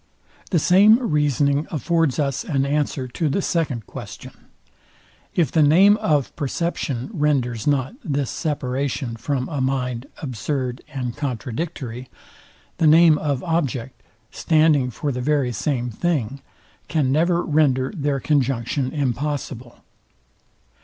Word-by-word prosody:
The 180 - +2
same 195 +7 +6
reasoning 150 - +1
affords 165 -3 0
us 140 -3 -1
an 135 -4 0
answer 140 -2 -1
to 150 +5 -1
the 145 - 0
second 150 - -1
question. - - -9 1.0
If 170 -4 +2
the 160 - +3
name 180 +8 +6
of 155 - 0
perception 145 - -3
renders 135 - 0
not 135 - +1
this 140 -4 -2
separation 135 -4 -2
from 130 +3 -2
a 145 -4 -3
mind 125 -1 -2
absurd 130 -1 -3
and 125 -3 -4
contradictory, 130 -2 -5 0.7
the 160 - +4
name 160 0 +6
of 140 -4 -2
object, 135 -7 -2 0.3
standing 155 -5 +3
for 145 +4 -3
the 125 -1 -3
very 140 -2 +1
same 125 +1 -2
thing, 135 -2 -2 0.5
can 145 -5 +1
never 170 +4 +2
render 145 -3 +1
their 145 -4 -1
conjunction 135 -2 0
impossible. 135 -3 -3
140 Hz, 120 wpm, -22 LUFS, 130-155 Hz, 1.0 s, same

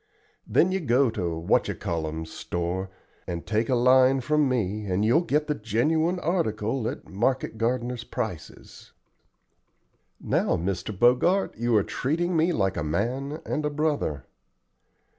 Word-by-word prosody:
Then 185 - +3
you 190 - 0
go 130 -5 +2
to 90 -7 -3
What 80 - +2
you - - -3
call 80 -2 -3
'em's 80 +1 -6
store, 90 +2 -3 0.4
and 85 -1 -4
take 110 +1 0
a 130 - +3
line 130 +2 +5
from 150 +2 +2
me, 105 -4 -1
and 95 +3 +1
you'll 120 +9 +4
git 150 -3 0
the 150 - 0
genuine 150 - 0
article 130 - -1
at - - -8
market 115 +2 -1
gardeners' 120 0 -1
prices." 110 -12 -7 1.3
"Now, - - +1
Mr. 90 +3 -3
Bogart, 130 - +3
you 120 0 0
are 105 - +4
treating 170 - -1
me 165 +2 +3
like 95 - 0
a 85 - -1
man 125 - -2
and 150 - -2
a 150 - 0
brother." 145 - -1
120 Hz, 150 wpm, -26 LUFS, 95-150 Hz, 1.3 s, line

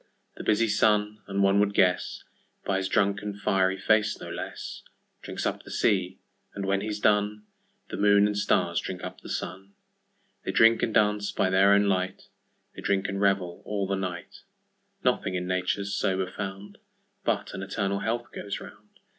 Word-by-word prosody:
The - - -7
busy 110 +2 +3
Sun 105 0 +2
(and 100 0 0
one 100 +1 +4
would 100 0 +2
guessBy 95 +1 -1
's 95 - -1
drunken 100 +1 0
fiery 95 -1 +1
face 105 +2 +2
no - - -7
less)Drinks - - -8
up - - -1
the - - -14
sea, 95 -2 +1 0.4
and 100 - -3
when 100 0 +1
he's 105 0 -3
done, 105 0 +2 0.5
The - - -5
Moon 100 0 +5
and 105 0 0
Stars 90 -4 +1
drink 90 - -6
up - - -7
the - - -10
Sun:They 95 +1 -8
drink 115 0 +5
and 115 - +1
dance 105 -1 +2
by 95 - +1
their 95 +1 +5
own 100 0 +5
light, 95 -2 -1 0.5
They - - -8
drink 100 0 0
and 100 0 -3
revel 95 -3 +1
all 100 -2 -2
the 100 - -2
night:Nothing 90 0 -4
in 90 0 -2
Nature's 95 +2 -1
sober 95 -1 0
found, 100 +1 -7 0.4
But - - -1
an - - -5
eternal 100 0 -1
health 115 +4 -2
goes 100 -1 -5
round. - - -14
100 Hz, 165 wpm, -27 LUFS, 95-105 Hz, 0.5 s, Moon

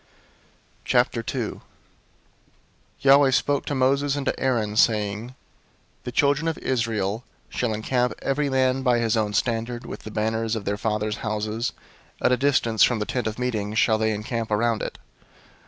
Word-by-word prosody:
002:001 120 -1 0 1.4
Yahweh 140 0 +6
spoke 140 +2 +1
to 145 - -1
Moses 140 +2 +2
and 140 -1 -3
to - - -1
Aaron, 115 -5 0
saying, 110 +2 +1 0.6
002:002 - - -38
"The 125 - -4
children 145 +5 +2
of 165 - -1
Israel 115 -3 -1 0.3
shall 120 -2 -1
encamp 125 +3 0
every 140 +1 0
man 130 0 +2
by 125 -2 +3
his 115 -1 +1
own 105 -2 0
standard, 120 +1 -1
with - - -7
the - - -9
banners 110 +1 -1
of 110 - -5
their 100 0 -1
fathers' 105 -1 -1
houses: 110 +1 -2 0.5
at - - +2
a - - +5
distance 125 -5 +1
from 120 - +5
the 105 - -2
tent 125 0 -2
of 110 - -4
meeting 110 -4 -2
shall 110 0 +3
they 110 0 +1
encamp 110 +2 -3
around 110 +1 +1
it." - - -5
115 Hz, 160 wpm, -24 LUFS, 110-130 Hz, 1.4 s, Yahweh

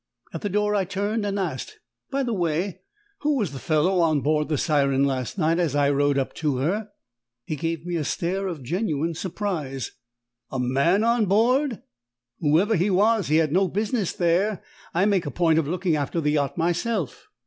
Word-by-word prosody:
At - - -5
the 205 - -2
door 210 +1 +1
I 200 -2 +2
turned 205 +3 -2
and 200 0 -2
asked, 165 -10 -4 0.3
"By 275 0 0
the 240 -3 -1
way, 175 0 -1 0.4
who 295 -1 +1
was 205 - -1
the 135 - -7
fellow 165 +6 +2
on 155 -4 +3
board 150 +2 +1
the 150 - +1
Siren 140 -3 +2
last 130 - -1
night 165 -1 +2
as 160 -5 0
I 145 -1 +3
rowed 145 0 +2
up 135 - -1
to 150 -5 0
her?" 195 +11 -1 0.6
He 155 - -3
gave 165 +1 -3
me 175 -1 -2
a 155 - -1
stare 185 +7 -2
of 165 -7 -5
genuine 165 - -1
surprise. 160 - -4 0.6
"A 135 - -4
man 140 - +2
on 230 -2 +2
board? 240 - +2 0.6
Whoever 170 +8 +3
he 185 +3 +2
was, 205 +1 +3
he 155 - +2
had 160 -2 +3
no 190 +4 +3
business 210 +1 -1
there. 180 +4 +1 0.3
I 180 +3 +2
make 195 -6 +1
a - - -1
point 160 +2 +2
of 155 - -1
looking 175 0 0
after 150 +3 -1
the 150 -2 +1
yacht 145 0 0
myself." 175 - -1
170 Hz, 190 wpm, -24 LUFS, 150-200 Hz, 0.6 s, on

